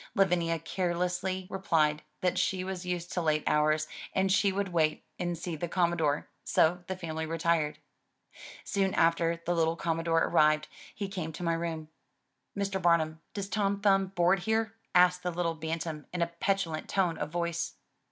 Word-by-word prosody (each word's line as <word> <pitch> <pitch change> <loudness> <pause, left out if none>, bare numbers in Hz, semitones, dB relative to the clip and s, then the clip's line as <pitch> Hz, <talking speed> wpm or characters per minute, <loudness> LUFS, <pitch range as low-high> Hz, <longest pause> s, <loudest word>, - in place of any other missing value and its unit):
Lavinia 175 -4 +2
carelessly 180 +2 -1
replied 155 -6 +1 0.2
that 180 0 +1
she 185 0 0
was 185 -1 -5
used 175 -1 -3
to 180 - 0
late 155 -2 +1
hours 155 +1 +2 0.3
and 190 0 +2
she 195 +1 +4
would 195 0 -1
wait 160 -3 +1 0.2
and 175 -1 -1
see 170 0 -4
the 170 +3 -3
Commodore, 170 -4 +1 0.2
so 175 +2 +2
the 190 - -2
family 160 -3 -4
retired. 165 -2 +1 0.9
Soon 195 -1 0
after 165 0 +2
the 175 - +1
little 165 -1 +2
Commodore 165 0 +1
arrived, 155 0 +3 0.3
he 200 - -3
came 180 -5 -4
to 175 - -6
my 170 -1 +1
room. 165 -2 -3 0.7
"Mr. 195 -1 -1
Bamum, 160 -3 +2 0.2
does 200 -1 -3
Tom 200 -1 0
Thumb 195 -1 +3
board 185 0 +2
here?*' 220 +2 0 0.2
asked 180 0 +5
the 180 - -1
little 170 -1 -1
bantam 160 -1 -4
in 175 -1 0
a 170 - -3
petulant 195 -5 -1
tone 180 -4 +1
of 150 - -2
voice. 170 0 -2
170 Hz, 165 wpm, -30 LUFS, 165-190 Hz, 0.9 s, asked